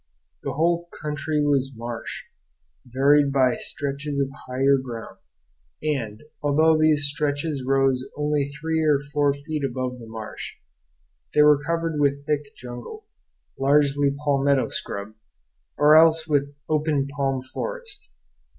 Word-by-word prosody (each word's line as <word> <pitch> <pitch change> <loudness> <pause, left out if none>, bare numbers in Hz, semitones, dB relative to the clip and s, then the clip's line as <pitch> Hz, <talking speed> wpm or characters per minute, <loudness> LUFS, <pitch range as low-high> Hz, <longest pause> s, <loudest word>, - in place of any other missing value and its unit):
The - - -3
whole 170 +2 +1
country 150 0 -1
was 135 -2 +1
marsh, 115 0 -6 0.6
varied 140 +3 +4
by 130 -3 +3
stretches 140 0 -4
of 135 -1 0 0.2
higher 135 +2 +3
ground; 115 -6 -8 0.7
and, 120 -8 -2 0.2
although 155 +2 +4
these 155 -2 +3
stretches 145 0 -1
rose 135 0 +1
only 150 -1 0
three 160 +2 -2
or 150 -2 +4 0.2
four 145 -1 +3
feet 145 +1 -5
above 130 -1 -3
the 115 - -10
marsh, 110 -1 -7 0.8
they 150 - +7
were 150 -1 +5
covered 165 0 -1
with 140 0 +1
thick 145 -1 -2
jungle, 120 -1 -9 0.5
largely 140 0 +3 0.2
palmetto 140 -1 +2
scrub, 100 +2 -5 0.6
or 150 +1 +6
else 160 0 +5
with 145 -2 +1 0.2
open 150 -3 +1
palm 135 -2 -2
forest. 430 - -7
140 Hz, 125 wpm, -24 LUFS, 135-150 Hz, 0.8 s, they